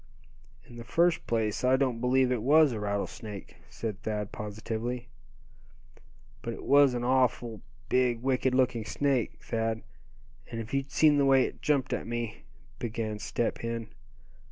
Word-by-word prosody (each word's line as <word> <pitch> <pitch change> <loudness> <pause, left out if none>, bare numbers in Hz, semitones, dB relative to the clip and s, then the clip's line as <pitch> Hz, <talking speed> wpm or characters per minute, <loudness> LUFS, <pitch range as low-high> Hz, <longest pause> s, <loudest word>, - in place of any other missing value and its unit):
"In 120 - -13
the 115 - -7
first 170 +7 +2
place, 110 -2 0
I 130 +1 +5
don't 130 -4 0
believe 130 0 +3
it 125 -3 0
was 150 +4 +5
a 110 - -3
rattlesnake!" 105 0 -4
said 110 -3 -5
Thad, 105 -2 -3
positively. 115 +3 -4 1.3
"But - - -4
it - - -10
was 140 -2 +5
an 120 - -2
awful 120 -3 +1 0.3
big, 125 -2 +1
wicked 130 -1 +1
looking 125 -3 +2
snake, 130 +3 0
Thad; 115 -1 -2 0.7
and 115 - -5
if 115 +2 -7
you'd 135 0 -1
seen 150 -2 +5
the 140 - +4
way 135 -1 +5
it - - -5
jumped 145 -3 +1
at - - -3
me 120 -1 -4 0.2
" 120 -2 -26
began 110 -2 -3
Step 115 +2 -2
Hen. 115 -1 -4
120 Hz, 155 wpm, -29 LUFS, 110-130 Hz, 1.3 s, I